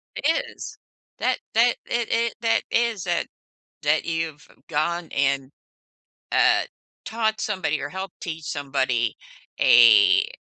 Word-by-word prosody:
It 325 Hz, -, 0 dB
is. -, -, -9 dB, 0.4 s
That -, -, +1 dB, 0.2 s
that 235 Hz, +2 st, +4 dB
it 235 Hz, -1 st, -1 dB
it 230 Hz, 0 st, +1 dB
that 225 Hz, -1 st, +2 dB
is 230 Hz, -5 st, 0 dB
that 175 Hz, -2 st, -1 dB, 0.6 s
that 150 Hz, +1 st, +1 dB
you've 165 Hz, 0 st, -3 dB, 0.2 s
gone 170 Hz, +3 st, -1 dB
and, 140 Hz, -1 st, 0 dB, 0.8 s
uh, -, -, +4 dB, 0.4 s
taught 220 Hz, -1 st, -1 dB
somebody 185 Hz, -7 st, -2 dB
or 145 Hz, -, -4 dB
helped 190 Hz, +2 st, -7 dB
teach 160 Hz, -2 st, -6 dB
somebody 135 Hz, -6 st, -1 dB, 0.5 s
a, 115 Hz, -4 st, +6 dB
165 Hz, 120 wpm, -23 LUFS, 145-220 Hz, 0.8 s, a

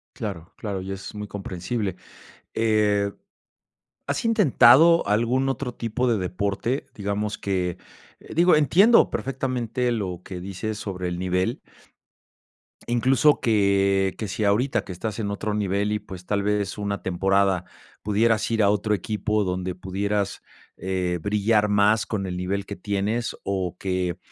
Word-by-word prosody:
Claro, 95 Hz, -6 st, -6 dB
claro, 100 Hz, -3 st, -4 dB
y 95 Hz, +1 st, -6 dB
es 95 Hz, +2 st, -7 dB
muy 105 Hz, 0 st, -5 dB
comprensible. 100 Hz, +1 st, -4 dB, 0.6 s
Eh, 105 Hz, -2 st, +2 dB, 1.0 s
¿has -, -, -1 dB
intentado 165 Hz, -, +6 dB
algún 120 Hz, +6 st, +1 dB
otro 135 Hz, -2 st, -3 dB
tipo 120 Hz, +2 st, -2 dB
de 115 Hz, -2 st, +2 dB
deporte?, 100 Hz, +8 st, -2 dB
digamos 105 Hz, +1 st, -2 dB
que, 90 Hz, -3 st, -2 dB, 0.4 s
eh, -, -, -11 dB
digo, 175 Hz, +2 st, +5 dB
entiendo 180 Hz, -, +5 dB
perfectamente 125 Hz, -2 st, -2 dB
lo 95 Hz, -6 st, -3 dB
que 90 Hz, -2 st, -7 dB
dices 100 Hz, +3 st, -4 dB
sobre 90 Hz, -4 st, -4 dB
el 90 Hz, 0 st, -4 dB
nivel. 95 Hz, +7 st, 0 dB, 1.3 s
Incluso 130 Hz, +4 st, +3 dB
que 100 Hz, -3 st, +2 dB
que 110 Hz, -, -4 dB
si 100 Hz, +3 st, -3 dB
ahorita 120 Hz, +3 st, +2 dB
que -, -, -9 dB
estás 105 Hz, +4 st, -4 dB
en 105 Hz, -2 st, -2 dB
otro 105 Hz, +1 st, -3 dB
nivel 100 Hz, 0 st, 0 dB
y, 105 Hz, -, 0 dB
pues, 95 Hz, -3 st, -10 dB
tal 100 Hz, +1 st, 0 dB
vez 105 Hz, 0 st, -1 dB
una 100 Hz, -1 st, -3 dB
temporada 95 Hz, 0 st, +1 dB, 0.4 s
pudieras 110 Hz, +2 st, +2 dB
ir 115 Hz, -2 st, +2 dB
a 100 Hz, -, +5 dB
otro 105 Hz, +1 st, +1 dB
equipo 105 Hz, +2 st, -1 dB
donde 90 Hz, -1 st, -3 dB
pudieras, 100 Hz, +2 st, -2 dB, 0.4 s
eh, 90 Hz, -2 st, -2 dB
brillar 105 Hz, +2 st, +2 dB
más 105 Hz, +2 st, +3 dB
con 100 Hz, -3 st, -2 dB
el 90 Hz, -1 st, -4 dB
nivel 95 Hz, +2 st, -2 dB
que 100 Hz, -, -6 dB
tienes 105 Hz, +4 st, -2 dB
o 95 Hz, -3 st, -2 dB
que, 90 Hz, -2 st, -2 dB
100 Hz, 145 wpm, -24 LUFS, 95-115 Hz, 1.3 s, intentado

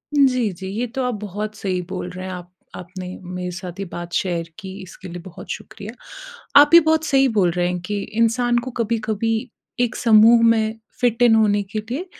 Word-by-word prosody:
जी, 255 Hz, -6 st, +3 dB
जी। 190 Hz, +2 st, -8 dB
ये 245 Hz, -, 0 dB
तो 265 Hz, -, -1 dB
आप 250 Hz, 0 st, -1 dB
बहुत 210 Hz, +1 st, -5 dB
सही 185 Hz, -3 st, -2 dB
बोल 185 Hz, -1 st, -4 dB
रहे 185 Hz, +1 st, -7 dB
हैं 185 Hz, -, -5 dB
आप 180 Hz, -1 st, -8 dB, 0.3 s
आपने 185 Hz, +1 st, -8 dB, 0.2 s
मेरे 180 Hz, 0 st, -5 dB
साथ 180 Hz, +1 st, -8 dB
ये 195 Hz, -, -3 dB
बात 175 Hz, -1 st, -8 dB
शेयर 170 Hz, -3 st, -1 dB
की, 190 Hz, -2 st, -8 dB
इसके 185 Hz, +1 st, -11 dB
लिए 175 Hz, 0 st, -7 dB
बहुत 175 Hz, 0 st, -12 dB
शुक्रिया। 210 Hz, +3 st, -8 dB, 0.7 s
आप 295 Hz, +3 st, +3 dB
ये 340 Hz, -, +11 dB
बहुत 320 Hz, 0 st, +3 dB
सही 270 Hz, -3 st, +3 dB
बोल 180 Hz, -3 st, +3 dB
रहे 175 Hz, +1 st, 0 dB
हैं 180 Hz, 0 st, -2 dB
कि 205 Hz, -1 st, -1 dB, 0.2 s
इंसान 240 Hz, +1 st, +2 dB
को 255 Hz, -, -5 dB
कभी-कभी 220 Hz, 0 st, -1 dB, 0.4 s
एक 245 Hz, -2 st, 0 dB
समूह 230 Hz, +1 st, +6 dB
में 225 Hz, -1 st, +2 dB, 0.2 s
फिट 245 Hz, -1 st, +1 dB
इन 230 Hz, -2 st, +6 dB
होने 205 Hz, -2 st, +3 dB
के 200 Hz, +2 st, -5 dB
लिए 250 Hz, -, -5 dB
210 Hz, 200 wpm, -21 LUFS, 180-230 Hz, 0.7 s, ये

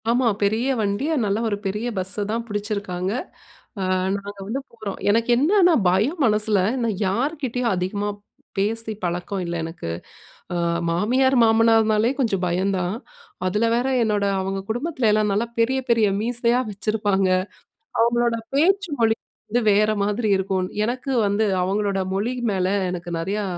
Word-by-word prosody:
ஆமா. 245 Hz, +1 st, +3 dB, 0.2 s
பெரிய 220 Hz, +5 st, +1 dB
வண்டி, 205 Hz, +5 st, -1 dB, 0.2 s
நல்ல 200 Hz, +1 st, 0 dB
ஒரு 205 Hz, -, -1 dB
பெரிய 210 Hz, +5 st, -2 dB
பஸ்ஸ 190 Hz, +3 st, -1 dB
தான் 230 Hz, +1 st, -2 dB
பிடிச்சிருக்காங்க, 205 Hz, -3 st, -3 dB, 0.7 s
அ -, -, 0 dB, 0.3 s
நாங்க 200 Hz, 0 st, -8 dB
வந்து 260 Hz, +6 st, -2 dB
போறோம், 220 Hz, -4 st, -6 dB
எனக்கு 230 Hz, +3 st, +2 dB
என்னன்னா 355 Hz, +5 st, +4 dB, 0.2 s
பயம் 225 Hz, -, +1 dB
மனசில 210 Hz, -2 st, +2 dB, 0.2 s
நான் 220 Hz, -4 st, -1 dB
யார்க்கிட்டேயும் 250 Hz, +1 st, -1 dB
அதிகமா 195 Hz, +3 st, -2 dB, 0.5 s
பேசி 220 Hz, +3 st, -1 dB
பழக்கம் 180 Hz, +2 st, -2 dB
இல்ல 170 Hz, 0 st, -3 dB
எனக்கு. 165 Hz, -, -5 dB, 0.6 s
ஆ -, -, -2 dB, 0.3 s
மாமியார், 255 Hz, +10 st, +2 dB
மாமனார்னாலே 225 Hz, 0 st, +4 dB
கொஞ்சம் 205 Hz, -8 st, 0 dB
பயம் 185 Hz, +3 st, 0 dB
தான், 180 Hz, +2 st, -1 dB, 0.5 s
அதில 210 Hz, +5 st, +1 dB
வேற 240 Hz, +2 st, 0 dB, 0.2 s
என்னோட 210 Hz, -2 st, +1 dB, 0.2 s
அவுங்க 195 Hz, +1 st, -2 dB
குடும்பத்துல 250 Hz, 0 st, 0 dB
எல்லாம் 210 Hz, -1 st, +2 dB
நல்லா 220 Hz, +4 st, 0 dB
பெரிய, 260 Hz, +4 st, +2 dB
பெரிய 230 Hz, -2 st, +4 dB
மீசையா 240 Hz, +1 st, +1 dB
வச்சிருப்பாங்க, 205 Hz, -2 st, 0 dB, 0.7 s
அவுங்களோட 235 Hz, 0 st, +2 dB, 0.2 s
பேச்சு 380 Hz, +6 st, +2 dB
மொழி 225 Hz, -1 st, +3 dB, 0.3 s
வந்து 240 Hz, +3 st, +1 dB
வேற 210 Hz, +1 st, +3 dB
மாதிரி 210 Hz, +2 st, 0 dB
இருக்கும், 190 Hz, -1 st, -1 dB, 0.2 s
எனக்கு 250 Hz, +4 st, -3 dB, 0.2 s
வந்து 205 Hz, +2 st, +1 dB, 0.2 s
அவுங்களோட 200 Hz, +1 st, 0 dB, 0.2 s
மொழி 220 Hz, +6 st, -1 dB, 0.2 s
மேல 185 Hz, -1 st, 0 dB, 0.2 s
எனக்கு 175 Hz, -1 st, -6 dB
நிறையா 200 Hz, +5 st, -2 dB
215 Hz, 140 wpm, -23 LUFS, 195-235 Hz, 0.7 s, என்னன்னா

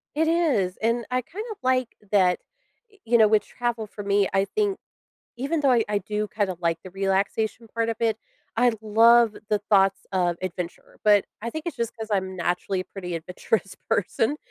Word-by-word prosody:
It 320 Hz, +1 st, +2 dB
is. 295 Hz, -, +2 dB
And, 230 Hz, +1 st, +1 dB
I 255 Hz, 0 st, +1 dB
kind 410 Hz, -, -7 dB
of 425 Hz, -, -7 dB
like 255 Hz, -1 st, +2 dB, 0.2 s
that, 185 Hz, -3 st, +4 dB, 0.5 s
eh, 410 Hz, -, -23 dB
you 235 Hz, +1 st, +4 dB
know, 220 Hz, -2 st, +6 dB
with 210 Hz, -1 st, +3 dB
travel 240 Hz, -3 st, -3 dB
for 205 Hz, -, -8 dB
me, 200 Hz, 0 st, +2 dB
I 195 Hz, 0 st, +3 dB
think, 410 Hz, -, 0 dB, 0.6 s
even 290 Hz, +5 st, -1 dB
though 275 Hz, -2 st, +3 dB
I 230 Hz, -2 st, +3 dB
I 210 Hz, -1 st, +1 dB
do 210 Hz, 0 st, -3 dB
kind 205 Hz, -2 st, -1 dB
of 180 Hz, -, -6 dB
like 170 Hz, -1 st, +1 dB
the 185 Hz, -, -8 dB
relaxation 195 Hz, +4 st, -1 dB
part 230 Hz, 0 st, 0 dB
of 225 Hz, -, -1 dB
it, 225 Hz, -1 st, +1 dB, 0.4 s
I 245 Hz, 0 st, +4 dB
love 230 Hz, +1 st, +5 dB
the 210 Hz, -2 st, +1 dB
thoughts 195 Hz, -1 st, +4 dB
of 175 Hz, -2 st, +1 dB
adventure- 180 Hz, -1 st, -6 dB
but, 205 Hz, -2 st, +5 dB, 0.2 s
I 230 Hz, -, -4 dB
think 315 Hz, +5 st, -6 dB
it's 340 Hz, -, -3 dB
just 235 Hz, 0 st, -3 dB
'cause 220 Hz, -1 st, -6 dB
I'm 190 Hz, -1 st, -1 dB
naturally 180 Hz, +2 st, -1 dB
a -, -, -5 dB
pretty 180 Hz, -3 st, -6 dB
adventurous 180 Hz, +4 st, -2 dB
person, 225 Hz, +8 st, +1 dB
215 Hz, 200 wpm, -25 LUFS, 195-240 Hz, 0.6 s, know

